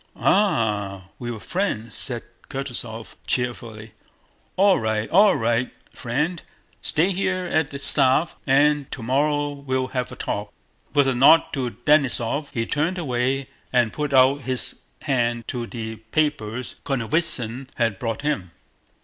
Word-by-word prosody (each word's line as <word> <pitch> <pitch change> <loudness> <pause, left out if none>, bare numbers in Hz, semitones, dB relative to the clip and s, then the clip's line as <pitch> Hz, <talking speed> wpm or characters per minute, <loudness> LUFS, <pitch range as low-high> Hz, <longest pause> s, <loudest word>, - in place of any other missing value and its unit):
"Ah, 105 - +1
we 120 - -5
were 115 -2 -5
friends," 115 - -2
said 120 -3 +1 0.3
Kutúzov 120 -4 -5
cheerfully. 115 -3 -2 0.6
"All 195 0 +5
right, 110 -1 -1
all 200 +2 +6
right, 115 +2 +1 0.2
friend, 150 +8 -2 0.4
stay 170 +6 +2
here 185 -1 -1
at 160 -4 +1
the 140 - -6
staff 140 +2 +2
and 145 +1 +3
tomorrow 145 +4 0
we'll 130 -2 -2
have 125 -1 -3
a - - -7
talk." 105 0 -3 0.4
With 140 -2 +5
a 135 - +2
nod 145 +6 +7
to 130 -4 -1 0.2
Denísov 140 -1 +2
he 115 -1 -1
turned 155 +9 0
away 135 -3 -1 0.2
and 120 -3 +2
put 150 -1 -2
out 135 +2 +5
his 130 0 -1 0.2
hand 120 -4 0
for 120 -2 -4
the 110 -2 -6
papers 120 -1 -2
Konovnítsyn 130 -2 0
had 115 -5 0
brought 115 +3 -3
him. 125 -12 -1
130 Hz, 135 wpm, -23 LUFS, 115-150 Hz, 0.6 s, nod